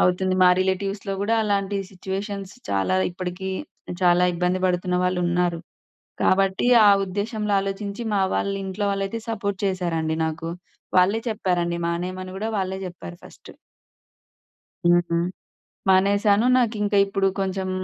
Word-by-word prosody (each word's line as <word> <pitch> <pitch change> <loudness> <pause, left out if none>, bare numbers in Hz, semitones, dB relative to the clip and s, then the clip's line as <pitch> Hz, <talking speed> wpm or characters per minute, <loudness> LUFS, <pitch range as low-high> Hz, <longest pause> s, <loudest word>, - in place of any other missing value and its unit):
అవుతుంది. 185 +1 +2
మా 180 - +7
రిలేటివ్స్‌లో 195 +1 -1
కూడా 225 +3 +1
అలాంటి 200 -1 0
సిట్యుయేషన్స్ 195 +1 -5 0.2
చాలా 95 -1 +1
ఇప్పడికి 185 +1 -5 0.5
చాలా 175 0 +5
ఇబ్బంది 180 +1 0
పడుతున్న 180 0 0
వాళ్ళున్నారు. 175 -1 +1 0.6
కాబట్టి 190 +3 +2 0.2
ఆ 205 - +8
ఉద్దేశంలో 210 +2 -3
ఆలోచించి 200 +3 -4
మా 195 - +2
వాళ్ళు 200 0 -1
ఇంట్లో 190 +2 -3
వాళ్ళైతే 195 +3 -3
సపోర్ట్ 200 -3 -3
చేసారండి 165 -4 -1
నాకు. 165 +1 -4 0.5
వాళ్ళే 200 +5 +3
చెప్పారండి 175 -5 -1
మానేయమని 185 +2 -4
కూడా 220 +2 -2
వాళ్ళే 190 0 -2
చెప్పారు 85 - -10
ఫస్టు. - - -14 1.3
హ్మ్. 175 0 +5
హ్మ్. 170 +1 +1 0.6
మానేసాను 200 +3 +4
నాకింక 215 -4 +1
ఇప్పుడు 195 0 0
కొంచెం 190 0 -2
190 Hz, 120 wpm, -23 LUFS, 180-200 Hz, 1.3 s, ఆ